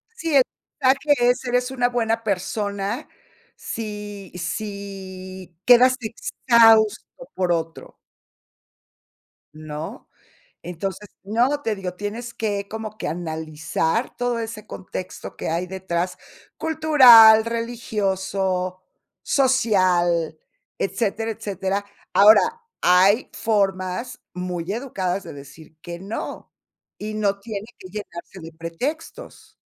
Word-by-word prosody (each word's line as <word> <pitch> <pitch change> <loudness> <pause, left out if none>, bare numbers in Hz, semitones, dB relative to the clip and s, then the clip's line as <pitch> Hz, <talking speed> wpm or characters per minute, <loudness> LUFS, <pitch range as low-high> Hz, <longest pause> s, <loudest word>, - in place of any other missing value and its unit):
Sí, 330 -9 -2
el 270 - +7 0.4
mensaje 270 -1 +3
es: 250 +1 0
"Eres 250 +1 0
una 245 -2 +1
buena 230 -2 0
persona, 200 0 -2 0.5
si 210 -3 -6
si 190 -1 -6
quedas 250 +1 +7
exhausto 225 - +3
por 180 -2 0
otro". 165 -1 -3 1.6
¿No? 155 0 -7 0.6
Entonces, 190 +4 -5 0.2
no, 240 +8 +1
te 225 -6 0
digo, 185 -3 -5
tienes 220 +5 -6
que, 205 -2 -2
como 215 0 -6
que - - -4
analizar 160 +5 -2
todo 245 -1 -1
ese 225 -2 -6
contexto 185 0 -7
que - - -4
hay 170 +3 -1
detrás, 180 -1 -3 0.4
cultural, 255 -9 +8
religioso, 195 -5 -2 0.4
social, 185 - +2 0.4
etcétera, 220 +3 -1
etcétera. 200 -1 -3 0.3
Ahora, 210 +2 +8 0.4
hay 190 +6 +4
formas 200 +2 -1
muy 180 -1 -4
educadas 195 -6 -2
de - - -8
decir 145 +3 -13
que 170 +1 -7
no, 200 +5 -6 0.5
y 215 +1 -5
no 200 -2 0
tiene 210 -1 -6
que 185 - -11
llenarse 190 -2 -8
de 165 0 -10
pretextos. 245 - -6
200 Hz, 105 wpm, -23 LUFS, 180-230 Hz, 1.6 s, cultural